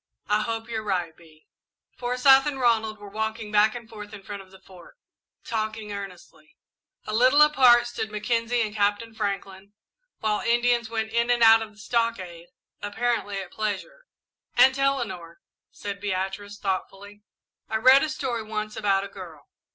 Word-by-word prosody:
"I 210 +1 +2
hope 225 0 -4
you're 225 -2 -3
right, 180 -6 -2
Bee." 155 -2 -20 0.5
Forsyth 260 +3 +4
and 280 -2 -3
Ronald 220 -3 +1
were 205 0 -11
walking 220 0 -4
back 215 +1 +4
and 235 -2 -8
forth 210 -2 -10
in 200 - -12
front 200 0 -7
of 190 - -17
the 190 0 -16
Fort, 185 -2 -16 0.5
talking 215 -1 -4
earnestly. 180 -6 -10 0.5
A 215 - -5
little 255 +6 +6
apart 250 -5 +6
stood 225 -2 -4
Mackenzie 230 +2 0
and 210 -1 -4
Captain 205 +2 0
Franklin, 200 -2 -5 0.4
while 210 -1 -1
Indians 240 -1 +1
went 220 -1 -3
in 235 +1 +1
and 240 -1 +3
out 225 0 +8
of 215 -1 -7
the - - -24
stockade, 210 -7 -2 0.3
apparently 205 -1 -2
at 190 -2 -6
pleasure. 220 - -4 0.5
"Aunt 265 +1 +6
Eleanor," 205 -12 -2 0.3
said 200 -1 -7
Beatrice, 200 +1 -3
thoughtfully, 200 +1 -5 0.5
"I 220 - -2
read 260 +5 +6
a 310 - 0
story 260 -6 -3
once 215 0 -5
about 195 -2 +1
a - - -5
girl. 175 -7 -12
215 Hz, 160 wpm, -25 LUFS, 200-235 Hz, 0.5 s, out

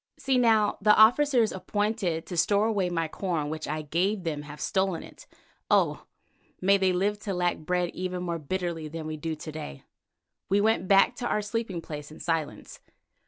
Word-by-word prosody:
"See 265 -2 +1
now, 220 -3 +3
the 210 +1 +6
officers 240 +1 +5
appointed 200 -4 -2
to 180 - -6
store 200 +5 +3
away 200 -5 0
my 165 -2 -1
corn 160 -3 -3
which 155 0 -5
I 155 +1 -3
gave 180 +6 0
them 155 -3 -3
have 150 0 -10
stolen 190 -3 0
it! - - -14 0.4
Oh! - - +2 0.5
may 195 +2 +4
they 190 -1 +3
live 200 +3 0
to 200 -3 -4
lack 175 0 0
bread 180 +2 -1
even 180 0 -4
more 170 -2 -3
bitterly 170 0 -3
than 160 +1 -6
we 155 0 -4
do 160 +1 -4
to 155 +1 -8
day." 150 - -8 0.7
We 200 +2 +3
went 215 -3 +2
back 195 +5 +5
to 240 - -3
our 210 - 0
sleeping 205 -4 -3
place 150 -2 -7
in 155 - -13
silence. 165 -3 -3
180 Hz, 185 wpm, -27 LUFS, 160-205 Hz, 0.7 s, the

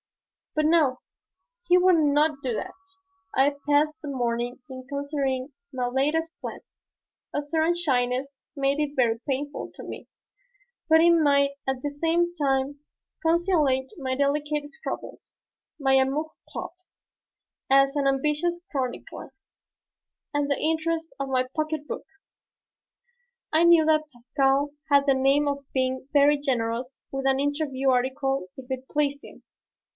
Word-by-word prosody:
But 305 0 +2
no, 305 -5 +3 0.7
he 355 - +6
would 365 0 +5
not 300 -1 +2
do 255 -3 -1
that. - - -4 0.6
I 280 +2 +3
passed 300 +1 +3
the 295 - -6
morning 240 -1 -2
in 255 -1 -9
considering 280 -1 -2 0.2
my 250 -2 -2
latest 300 +6 0
plan. - - -6 0.7
A 290 - 0
certain 320 +3 +1
shyness 260 -5 0 0.3
made 275 0 +1
it 295 -1 -1
very 230 -3 +2
painful 285 +2 -3
to - - -9
me. - - -8 0.8
But 320 0 +7
it 340 +1 +6
might 285 -4 +4 0.2
at 265 -1 -2
the 290 - -2
same 335 +4 +1
time 275 -1 0 0.4
conciliate 325 -6 +2
my 260 -3 -2
delicate 290 +1 0
scruples, 475 - -8 0.4
my 270 -2 +2
"amour 270 +4 +2 0.2
propre" 365 +1 -7 0.9
as 275 +1 +5
an 285 -1 +1
ambitious 300 +6 +1
chronicler, 260 -4 -4 1.0
and 290 0 0
the 280 - 0
interests 325 +1 -1
of 275 -1 -3
my 255 -1 +1
pocket 310 -1 -2
book. - - -5 1.5
I 320 +2 +5
knew 340 -2 +6
that 310 -1 +2
Pascal 270 +3 +1 0.2
had 280 0 +5
the 275 - +4
name 275 +2 +3
of 280 0 -2
being 260 0 -1
very 290 +1 +5
generous 245 -2 -2
with 270 0 -3
an 270 0 +2
interview 285 -2 0
article 265 -2 0
if 265 - -9
it 260 0 -5
pleased 285 -1 0
him. - - -14
280 Hz, 140 wpm, -26 LUFS, 265-305 Hz, 1.5 s, But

